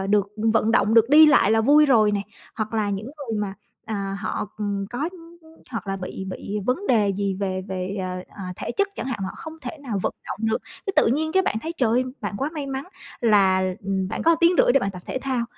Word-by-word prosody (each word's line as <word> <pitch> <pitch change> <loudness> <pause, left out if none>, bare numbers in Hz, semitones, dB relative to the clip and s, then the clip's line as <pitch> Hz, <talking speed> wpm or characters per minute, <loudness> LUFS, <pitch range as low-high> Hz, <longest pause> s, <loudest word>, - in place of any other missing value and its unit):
ờ, 190 - -2
được 200 0 +2 0.2
vận 225 0 +2
động, 220 -2 +3
được 230 0 +6
đi 310 +3 +9
lại 250 -8 +5
là 225 0 +4
vui 295 +5 +6
rồi 215 -5 +4
nè. 205 - 0 0.4
Hoặc 215 0 -3
là 210 -2 +1
những 200 +2 -3
người 270 -5 -5
mà, 200 -2 -3 0.3
à, 195 -3 -3
họ, 215 0 -3
ừm, 200 -2 -2
có 270 +6 -2 0.6
hoặc 225 -4 -5
là 195 - -2
bị 190 0 -6
bị 205 +2 -4
vấn 265 +11 0
đề 210 -5 +3
gì 200 -1 -1
về 185 -1 -2
về, 190 +1 -3
ờ, 185 0 -4
ờ, 200 - -7
thể - - -4
chất 400 0 +2
chẳng - - -5
hạn, 250 -5 -3
họ 190 - -3
không 320 -1 -8
thể 260 +4 -7
nào 235 -8 -3
vận - - 0 0.2
động - - -4
được, 220 - +1 0.3
cái 390 - 0
tự - - +5
nhiên 310 +7 +1
cái 380 - +4
bạn 360 - -1
thấy, 325 +2 -3
trời 245 -7 +2
ơi, 250 +3 +2 0.2
bạn 205 -1 -4
quá 280 +3 -1
may 295 -3 -4
mắn 270 0 -4 0.4
là, 195 -5 +4 0.2
ừm, 190 -1 -1
bạn - - -3
có 330 0 +4
tiếng 340 +1 +6
rưỡi - - +4
để 275 - +4
bạn 195 - -1
tập 180 -1 -9
thể - - -3
thao 260 -3 -1
220 Hz, 250 wpm, -24 LUFS, 195-270 Hz, 0.6 s, đi